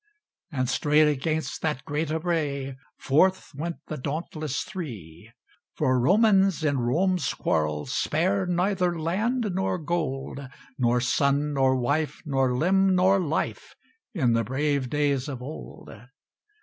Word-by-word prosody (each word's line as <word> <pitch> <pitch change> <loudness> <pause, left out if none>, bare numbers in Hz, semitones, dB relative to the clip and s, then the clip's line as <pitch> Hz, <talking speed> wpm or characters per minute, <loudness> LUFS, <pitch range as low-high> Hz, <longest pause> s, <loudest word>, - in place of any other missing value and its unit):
And 130 -4 -1
straight 150 +4 +3
against 150 -1 -1
that 150 -3 -2
great 150 +1 -2
array 155 -5 -2 0.2
Forth 185 +7 +2
went 165 +4 -4
the 155 - -5
dauntless 155 +1 -3
Three. 120 - -8 0.4
For 130 -1 +2
Romans 195 - +4
in 140 -3 +1
Rome's 175 +10 +1
quarrel 75 -1 0
Spared 180 +8 0
neither 180 -1 +1
land 210 +7 0
nor 190 0 0
gold, 150 -5 -3 0.4
Nor 120 0 +2
son 140 +3 +1
nor 135 -1 +3
wife, 145 +5 -1
nor 135 -3 +1
limb 190 +4 +3
nor 190 +2 +4
life 160 -3 -3 0.4
In 125 -9 +2
the 115 0 +2
brave 135 +2 -1
days 145 -1 0
of 130 -3 -5
old. 150 +5 -9
150 Hz, 125 wpm, -26 LUFS, 135-175 Hz, 0.4 s, Romans